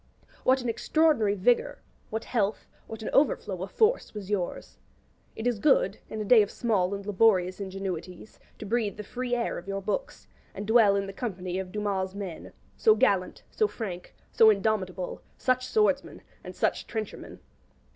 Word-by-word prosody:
What 260 Hz, 0 st, +3 dB
an -, -, -3 dB
extraordinary 230 Hz, -3 st, +2 dB
vigour, 235 Hz, +5 st, +2 dB, 0.3 s
what 220 Hz, 0 st, -3 dB
health, 215 Hz, -3 st, -1 dB, 0.2 s
what 220 Hz, 0 st, -8 dB
an -, -, -4 dB
overflow 210 Hz, -9 st, +1 dB
of 190 Hz, -, -4 dB
force 440 Hz, -, +1 dB
was 205 Hz, -1 st, -6 dB
yours! 185 Hz, -4 st, -3 dB, 0.6 s
It 220 Hz, -, -6 dB
is 240 Hz, -4 st, +1 dB
good, -, -, +3 dB
in 220 Hz, -, -5 dB
a 215 Hz, -, -3 dB
day 225 Hz, +1 st, +7 dB
of 205 Hz, -, 0 dB
small 200 Hz, -5 st, 0 dB
and 200 Hz, 0 st, -8 dB
laborious 190 Hz, -3 st, +3 dB
ingenuities, 190 Hz, -1 st, -6 dB, 0.2 s
to -, -, -8 dB
breathe 215 Hz, -1 st, -1 dB
the 210 Hz, -, -6 dB
free 245 Hz, +3 st, -3 dB
air 235 Hz, -1 st, -2 dB
of 175 Hz, -, -15 dB
your 195 Hz, 0 st, -2 dB
books, -, -, -4 dB, 0.3 s
and 200 Hz, -, -5 dB
dwell 220 Hz, -2 st, +5 dB
in 200 Hz, 0 st, 0 dB
the 195 Hz, -, -7 dB
company 185 Hz, -5 st, -4 dB
of 185 Hz, -1 st, -6 dB
Dumas's 195 Hz, -2 st, -2 dB
men 190 Hz, -5 st, -7 dB, 0.2 s
so 440 Hz, -1 st, +5 dB
gallant, -, -, +1 dB
so 430 Hz, -, +2 dB
frank, 185 Hz, -, -7 dB, 0.2 s
so 225 Hz, -, +6 dB
indomitable, 195 Hz, -3 st, -1 dB, 0.2 s
such 255 Hz, 0 st, 0 dB
swordsmen, 430 Hz, +9 st, +1 dB, 0.2 s
and -, -, -9 dB
such -, -, -1 dB
trenchermen. 220 Hz, -2 st, -6 dB
210 Hz, 170 wpm, -27 LUFS, 190-240 Hz, 0.6 s, day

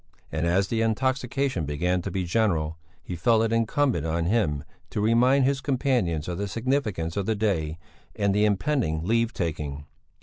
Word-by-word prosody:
And 80 Hz, +1 st, -1 dB
as 95 Hz, +3 st, +2 dB
the 115 Hz, -1 st, 0 dB
intoxication 125 Hz, -, 0 dB
began 90 Hz, +5 st, 0 dB
to -, -, -4 dB
be 95 Hz, -2 st, -2 dB
general, 85 Hz, -5 st, 0 dB, 0.2 s
he 90 Hz, -, -5 dB
felt 115 Hz, +5 st, +3 dB
it 115 Hz, 0 st, 0 dB
incumbent 115 Hz, +4 st, +1 dB
on 80 Hz, +1 st, -1 dB
him 85 Hz, -8 st, +1 dB, 0.3 s
to -, -, -3 dB
remind 125 Hz, +5 st, +4 dB
his 135 Hz, 0 st, +1 dB
companions 125 Hz, -, 0 dB
of 90 Hz, 0 st, -3 dB
the 100 Hz, -, -1 dB
significance 110 Hz, -, -1 dB
of 100 Hz, -, -1 dB
the 110 Hz, -, +1 dB
day 85 Hz, -7 st, -1 dB, 0.4 s
and 100 Hz, -1 st, +1 dB
the 105 Hz, +1 st, +2 dB
impending 105 Hz, -, 0 dB
leave 115 Hz, +2 st, +2 dB
taking. 75 Hz, -6 st, -4 dB
105 Hz, 170 wpm, -26 LUFS, 85-120 Hz, 0.4 s, remind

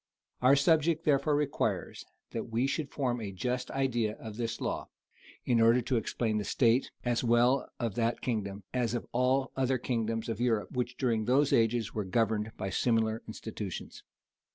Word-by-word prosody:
Our 130 Hz, +2 st, +6 dB
subject 160 Hz, +2 st, +3 dB
therefore 145 Hz, 0 st, +3 dB
requires 145 Hz, -1 st, -1 dB, 0.3 s
that -, -, -3 dB
we 115 Hz, +3 st, +1 dB
should 145 Hz, +1 st, -2 dB
form 125 Hz, -4 st, -1 dB
a 100 Hz, -3 st, -4 dB
just 125 Hz, +6 st, -2 dB
idea 120 Hz, -5 st, 0 dB
of 110 Hz, -2 st, -9 dB
this 115 Hz, 0 st, -3 dB
law, -, -, -3 dB, 0.6 s
in 120 Hz, -2 st, +3 dB
order 115 Hz, +2 st, +6 dB
to 125 Hz, +2 st, -1 dB
explain 110 Hz, 0 st, -1 dB
the -, -, -2 dB
state, 120 Hz, +3 st, +2 dB, 0.2 s
as 120 Hz, 0 st, +1 dB
well 120 Hz, +3 st, +3 dB
of 115 Hz, -4 st, -1 dB
that 115 Hz, +2 st, 0 dB
kingdom, 105 Hz, -4 st, -3 dB
as 120 Hz, -2 st, 0 dB
of 120 Hz, -, -3 dB
all 130 Hz, +2 st, +1 dB
other 130 Hz, 0 st, +1 dB
kingdoms 115 Hz, -2 st, -2 dB
of 115 Hz, 0 st, -3 dB
Europe, 115 Hz, -4 st, +1 dB
which 125 Hz, -1 st, -3 dB
during 115 Hz, -5 st, 0 dB
those 135 Hz, +4 st, +3 dB
ages 115 Hz, -1 st, +2 dB
were 105 Hz, -, -1 dB
governed 110 Hz, +2 st, 0 dB
by 95 Hz, -, -3 dB
similar 115 Hz, -1 st, +1 dB
institutions. 110 Hz, -3 st, -6 dB
120 Hz, 170 wpm, -30 LUFS, 110-130 Hz, 0.6 s, Our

